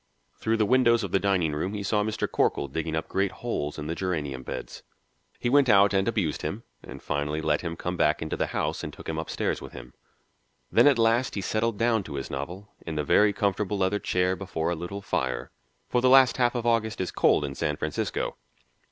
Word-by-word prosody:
Through 110 Hz, 0 st, +1 dB
the 110 Hz, -, +2 dB
windows 120 Hz, -1 st, +4 dB
of 100 Hz, -, -4 dB
the 95 Hz, -, +3 dB
dining 95 Hz, -6 st, +1 dB
room 90 Hz, +7 st, -2 dB
he 100 Hz, -, -4 dB
saw 105 Hz, +1 st, +1 dB
Mr. 110 Hz, 0 st, -2 dB
Corkle -, -, 0 dB
digging 80 Hz, +3 st, -3 dB
up 80 Hz, -, -2 dB
great 95 Hz, 0 st, 0 dB
holes 75 Hz, -11 st, -3 dB
in 75 Hz, -, -5 dB
the 80 Hz, -, -2 dB
geranium 75 Hz, -8 st, -3 dB
beds. -, -, -7 dB, 0.6 s
He -, -, -2 dB
went 135 Hz, +1 st, +4 dB
out 100 Hz, -1 st, +6 dB
and 95 Hz, 0 st, +2 dB
abused 100 Hz, -10 st, -1 dB
him -, -, -4 dB, 0.2 s
and -, -, -11 dB
finally 75 Hz, +1 st, -2 dB
let 75 Hz, -1 st, +1 dB
him 85 Hz, -1 st, -4 dB
come 90 Hz, +2 st, -4 dB
back 75 Hz, -2 st, +2 dB
into 80 Hz, -, -3 dB
the -, -, -1 dB
house -, -, -2 dB
and -, -, -4 dB
took -, -, -12 dB
him -, -, -2 dB
upstairs -, -, -2 dB
with -, -, -10 dB
him. 60 Hz, -, -10 dB, 0.8 s
Then -, -, +6 dB
at 140 Hz, -3 st, +5 dB
last 115 Hz, +2 st, +2 dB
he 100 Hz, -, -2 dB
settled 110 Hz, +2 st, -1 dB
down 115 Hz, -1 st, +2 dB
to -, -, -7 dB
his 70 Hz, -, -5 dB
novel, 85 Hz, +9 st, -6 dB
in 80 Hz, -, -5 dB
the 75 Hz, -, 0 dB
very 105 Hz, +7 st, +4 dB
comfortable 100 Hz, 0 st, -1 dB
leather 95 Hz, +2 st, +1 dB
chair, 90 Hz, -1 st, +1 dB
before 85 Hz, -4 st, -3 dB
a -, -, -1 dB
little 90 Hz, +5 st, -6 dB
fire, -, -, -2 dB, 0.4 s
for 125 Hz, -, +1 dB
the 130 Hz, -, +4 dB
last 130 Hz, -1 st, +6 dB
half 120 Hz, -1 st, +2 dB
of 120 Hz, -1 st, -2 dB
August 115 Hz, -2 st, +1 dB
is 95 Hz, -, -2 dB
cold 75 Hz, -, +3 dB
in 70 Hz, -, -5 dB
San 75 Hz, +1 st, -2 dB
Francisco. 75 Hz, -1 st, -3 dB
95 Hz, 220 wpm, -27 LUFS, 80-110 Hz, 0.8 s, out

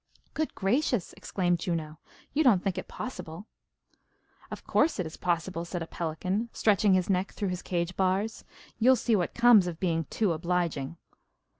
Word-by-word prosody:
"Good 315 Hz, 0 st, -2 dB
gracious!" 235 Hz, -, 0 dB
exclaimed 175 Hz, -2 st, -1 dB
Juno. 160 Hz, -3 st, -3 dB, 0.3 s
"You 305 Hz, +3 st, +3 dB
don't 215 Hz, -10 st, +4 dB
think 195 Hz, -3 st, -1 dB
it -, -, -8 dB
possible?" 190 Hz, -7 st, -7 dB, 1.0 s
"Of -, -, -7 dB
course 320 Hz, -, +2 dB
it 185 Hz, -, -1 dB
is 160 Hz, -, -7 dB
possible," 170 Hz, 0 st, -1 dB
said 170 Hz, 0 st, -4 dB
a -, -, -5 dB
pelican, 180 Hz, +7 st, -3 dB
stretching 205 Hz, -2 st, +3 dB
his 185 Hz, -1 st, +1 dB
neck 190 Hz, 0 st, 0 dB
through 200 Hz, -3 st, -2 dB
his 180 Hz, 0 st, -3 dB
cage 175 Hz, 0 st, -2 dB
bars. 195 Hz, +4 st, 0 dB, 0.4 s
"You'll 255 Hz, +3 st, +6 dB
see 230 Hz, -1 st, +1 dB
what 180 Hz, -4 st, -1 dB
comes 235 Hz, -6 st, +6 dB
of 170 Hz, -2 st, -5 dB
being 165 Hz, -3 st, 0 dB
too 210 Hz, +2 st, 0 dB
obliging." 170 Hz, -3 st, -2 dB
185 Hz, 165 wpm, -28 LUFS, 170-215 Hz, 1.0 s, You'll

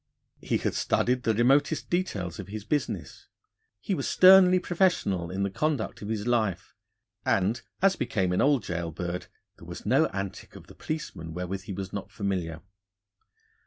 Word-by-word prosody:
He -, -, 0 dB
had -, -, -2 dB
studied 125 Hz, +1 st, +1 dB
the 115 Hz, -2 st, +1 dB
remotest 135 Hz, +7 st, +2 dB
details 100 Hz, -, -2 dB
of -, -, -6 dB
his 105 Hz, +1 st, -7 dB
business; 145 Hz, +2 st, -3 dB, 0.5 s
he 155 Hz, -, -2 dB
was -, -, -2 dB
sternly 185 Hz, 0 st, +7 dB
professional 170 Hz, -, +1 dB
in 95 Hz, +3 st, -2 dB
the 100 Hz, -, -1 dB
conduct 150 Hz, 0 st, -2 dB
of 100 Hz, -, -6 dB
his 110 Hz, -1 st, -2 dB
life, 110 Hz, -6 st, 0 dB, 0.5 s
and, 100 Hz, +5 st, +1 dB, 0.2 s
as 195 Hz, -1 st, +5 dB
became 105 Hz, -8 st, 0 dB
an 90 Hz, -, +1 dB
old 140 Hz, -6 st, +3 dB
gaol 85 Hz, -1 st, -3 dB
bird, 85 Hz, +2 st, -5 dB, 0.3 s
there -, -, -13 dB
was -, -, -8 dB
no -, -, +4 dB
antic 100 Hz, -1 st, -6 dB
of -, -, -11 dB
the -, -, -14 dB
policeman 80 Hz, -, -6 dB
wherewith 90 Hz, +2 st, -4 dB
he 100 Hz, -, -5 dB
was 95 Hz, 0 st, -6 dB
not 100 Hz, -, -5 dB
familiar. 90 Hz, -5 st, -3 dB
105 Hz, 165 wpm, -27 LUFS, 90-145 Hz, 0.5 s, sternly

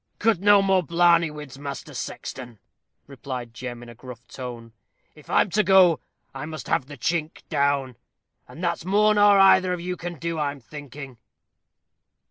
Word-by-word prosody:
"Cut 220 Hz, -4 st, +2 dB
no 205 Hz, 0 st, +5 dB
more 190 Hz, -1 st, +3 dB
blarneyfied 170 Hz, 0 st, +3 dB
whids, 140 Hz, -3 st, -10 dB
Master 140 Hz, -2 st, -7 dB
Sexton," 120 Hz, -3 st, -7 dB, 0.5 s
replied 130 Hz, -3 st, -7 dB
Jem, 120 Hz, 0 st, -7 dB
in 120 Hz, -, -12 dB
a -, -, -10 dB
gruff 125 Hz, 0 st, -12 dB
tone. 120 Hz, -3 st, -9 dB, 0.4 s
"If 150 Hz, -, -18 dB
I'm 195 Hz, -, +2 dB
to 215 Hz, -, +3 dB
go, 185 Hz, -5 st, +5 dB, 0.3 s
I 135 Hz, +3 st, -6 dB
must 155 Hz, -4 st, -8 dB
have 130 Hz, -, 0 dB
the 145 Hz, 0 st, -10 dB
chink 165 Hz, +3 st, -2 dB
down, 140 Hz, -4 st, 0 dB, 0.5 s
and 170 Hz, -, -11 dB
that's 170 Hz, -2 st, -1 dB
more 210 Hz, +4 st, +3 dB
nor 205 Hz, -1 st, +5 dB
either 190 Hz, -1 st, +5 dB
of 180 Hz, -, -4 dB
you 180 Hz, +1 st, -4 dB
can 175 Hz, 0 st, -6 dB
do, 165 Hz, +2 st, -4 dB
I'm 145 Hz, -1 st, -2 dB
thinking." 140 Hz, -1 st, -10 dB
150 Hz, 165 wpm, -24 LUFS, 130-180 Hz, 0.5 s, no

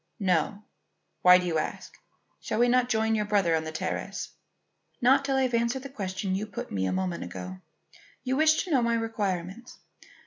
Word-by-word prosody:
"No. 190 Hz, +2 st, 0 dB, 0.6 s
Why 180 Hz, 0 st, +8 dB
do 180 Hz, -, -2 dB
you 165 Hz, -3 st, 0 dB
ask? -, -, -5 dB, 0.5 s
Shall -, -, -3 dB
we 240 Hz, +1 st, +4 dB
not 250 Hz, 0 st, +3 dB
join 220 Hz, -1 st, +1 dB
your 210 Hz, -1 st, +1 dB
brother 200 Hz, -5 st, +2 dB
on 160 Hz, 0 st, -1 dB
the 160 Hz, -, -4 dB
terrace?" 160 Hz, -, -4 dB, 0.7 s
"Not 265 Hz, +3 st, +4 dB
till 270 Hz, -1 st, 0 dB
I 265 Hz, -, +3 dB
have 255 Hz, -2 st, -1 dB
answered 235 Hz, +3 st, 0 dB
the 275 Hz, -, -7 dB
question 195 Hz, -5 st, -3 dB
you 205 Hz, +3 st, -2 dB
put 205 Hz, -, -7 dB
me 95 Hz, -1 st, -1 dB
a -, -, -1 dB
moment 185 Hz, -2 st, -2 dB
ago. 185 Hz, +1 st, -7 dB, 0.6 s
You 260 Hz, 0 st, 0 dB
wished 310 Hz, +2 st, +4 dB
to 365 Hz, -, -7 dB
know 265 Hz, -4 st, +4 dB
my 235 Hz, 0 st, +1 dB
requirements. 210 Hz, -1 st, -3 dB
215 Hz, 195 wpm, -27 LUFS, 185-245 Hz, 0.7 s, Why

